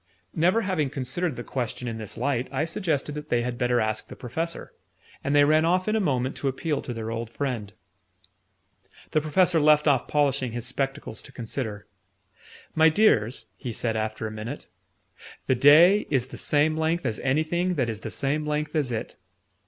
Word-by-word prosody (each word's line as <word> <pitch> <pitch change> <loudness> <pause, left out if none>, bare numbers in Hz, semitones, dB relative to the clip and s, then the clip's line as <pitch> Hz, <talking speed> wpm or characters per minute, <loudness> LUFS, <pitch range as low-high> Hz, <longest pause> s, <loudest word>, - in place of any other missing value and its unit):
Never 180 +8 +3
having 180 -9 0
considered 140 +4 -2
the 120 - -6
question 125 -1 -4
in 115 -1 -4
this 110 0 -6
light, 130 0 0
I 140 +3 0
suggested 160 -5 -2
that 150 0 -7
they 120 -1 +1
had 120 0 -4
better 125 -1 +2
ask 110 0 -1
the - - -10
Professor; 160 +8 -5 0.5
and 140 +1 0
they 145 - +7
ran 155 +2 +4
off 180 +3 +2
in 215 - +1
a - - +2
moment 130 -8 0
to 140 - -2
appeal 145 +3 -1
to - - -6
their 115 -1 -4
old 115 0 -4
friend. 120 -6 -3 1.4
The 155 - +2
Professor 165 +3 +3
left 150 0 +4
off 135 -4 +3
polishing 140 -4 +1
his 120 -1 -4
spectacles 135 -2 -3
to - - -13
consider. 110 -3 -5 0.9
"My 160 0 +6
dears," 140 - +2
he 125 - -5
said 115 0 -1
after 110 0 -2
a 110 - -4
minute, 110 +6 -6 0.8
"the - - +3
day 160 +10 +6
is 130 -3 0
the - - -9
same 150 +1 +2
length 160 +1 0
as 115 -3 -1
anything 160 +6 0
that 130 -6 0
is 110 -2 -4
the - - -6
same 145 +2 -1
length 150 +1 -2
as 145 -5 0
it." 110 - -4
140 Hz, 185 wpm, -26 LUFS, 120-155 Hz, 1.4 s, they